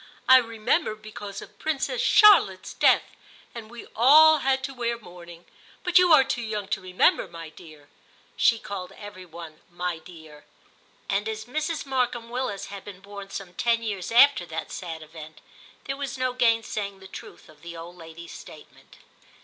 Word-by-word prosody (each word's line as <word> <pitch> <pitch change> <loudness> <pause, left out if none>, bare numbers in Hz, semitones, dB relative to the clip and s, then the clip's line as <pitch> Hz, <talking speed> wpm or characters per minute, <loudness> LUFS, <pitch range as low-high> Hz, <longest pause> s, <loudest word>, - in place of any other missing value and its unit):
I 260 - +9
remember 230 +2 0
because 210 -2 -9
of - - -17
Princess 315 - -2
Charlotte's 400 - +5
death, - - +4 0.5
and 225 -2 -9
we 240 -1 -10
all 310 +6 +7
had 265 -1 0
to 270 - -4
wear 235 -2 -2
mourning; 175 -4 -13 0.4
but 360 0 +5
you 360 -1 +4
are 305 -4 +8
too 260 -2 -3
young 215 -3 -4
to - - -2
remember, 185 0 +2
my 165 -1 -10
dear' 150 -2 -15 0.5
(she 230 - +3
called 195 -3 -7
every 200 -3 -11
one 165 -2 -11
*my 175 -1 -4
dear'). 160 -3 -14 0.6
And 205 +2 -1
as 220 0 -5
Mrs. 310 +6 -3
Markham 245 -3 -2
Willis 245 -6 -3
had 200 -1 -9
been 190 -2 -11
born 200 0 -10
some 190 -2 -8
ten 230 +3 0
years 200 -4 -4
after 245 -3 +6
that 160 -1 -6
sad 165 -3 -7
event, 155 0 -12 0.4
there 275 0 -5
was 275 -2 -5
no 255 -1 -1
gainsaying 225 -5 0
the 190 - -12
truth - - -12
of 150 -1 -19
the 170 0 -9
old 170 +2 -10
lady's 165 0 -11
statement. - - -14
205 Hz, 170 wpm, -25 LUFS, 175-250 Hz, 0.6 s, I